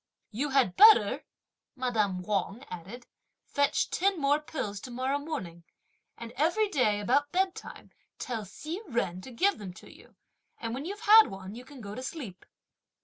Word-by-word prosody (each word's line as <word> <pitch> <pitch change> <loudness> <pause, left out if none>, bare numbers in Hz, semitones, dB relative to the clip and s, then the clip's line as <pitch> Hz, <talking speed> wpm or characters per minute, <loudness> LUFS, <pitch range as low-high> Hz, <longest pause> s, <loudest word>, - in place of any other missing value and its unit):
"You 265 +7 -2
had 265 -9 +2
better," 435 +1 +6 0.5
madame 215 -8 -1
Wang 205 +4 -2
added, 195 +8 -8 0.4
"fetch 285 0 0
ten 390 -1 +1
more 285 +1 +3
pills 215 -10 -5
tomorrow 255 +5 -2
morning; 185 - -6 0.5
and 235 -1 -8
every 350 +9 +2
day 235 - +2
about 285 +8 +1
bedtime 375 0 -3 0.3
tell 235 -4 -4
Hsi 310 - -7
Jen 185 -6 -1
to 260 - -10
give 370 - +1
them 190 -4 -7
to - - -14
you; - - -19 0.4
and 230 0 -4
when 270 +4 -5
you've 405 +4 -6
had 445 0 +8
one 195 0 -8
you 240 +2 -9
can 265 -1 -13
go 200 -1 -7
to 255 - -6
sleep!" 260 - -7
255 Hz, 160 wpm, -29 LUFS, 205-305 Hz, 0.5 s, had